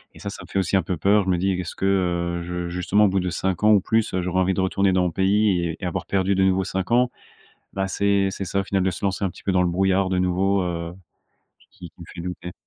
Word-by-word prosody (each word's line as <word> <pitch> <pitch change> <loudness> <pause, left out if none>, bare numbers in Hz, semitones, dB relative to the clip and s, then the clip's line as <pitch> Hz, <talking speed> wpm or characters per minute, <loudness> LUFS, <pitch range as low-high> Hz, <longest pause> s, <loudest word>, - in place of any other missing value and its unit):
et - - -13
ça 100 - -5
ça - - -9
me - - -13
fait - - -4
aussi 95 0 0
un 95 - +2
peu 90 - -3
peur. 100 +3 +3
Je 95 - -2
me 90 - +2
dis: 95 +1 0
«Qu 90 - -2
est-ce 80 - -7
que, 95 - -3
heu, 85 -3 0
je 90 0 -4
justement 90 +4 +2
au - - +5
bout 95 +1 +1
de 90 0 -2
5 95 +2 -2
ans 105 - +6
ou 100 - +6
plus, 110 +2 0
heu, 95 - 0
j'aurais 90 +1 -1
envie 95 +1 +1
de 95 - 0
retourner 95 +1 +1
dans 90 -1 +2
mon 90 - 0
pays 95 0 +2
et 80 - -5
et - - -5
avoir 90 - -3
perdu 95 0 +1
de 95 - +2
nouveau 95 0 +2
5 95 +3 -4
ans?» 125 +1 +3 0.6
Bah, 95 0 -1
c'est 100 0 +1
c'est 95 - -5
ça 100 +3 -1
au - - -3
final 95 0 0
de 95 - +2
se 95 - -7
lancer 100 0 -1
un 95 - -3
petit - - -15
peu 100 - -1
dans 90 -1 +3
le 90 - +1
brouillard 95 +2 +1
de 90 - 0
nouveau, 95 +2 +1
heu, 85 -1 -4 0.8
qui 90 -3 -12
qui - - -24
me 85 - -8
fait 85 - -8
douter. 90 0 -6
95 Hz, 305 wpm, -23 LUFS, 90-100 Hz, 0.8 s, ans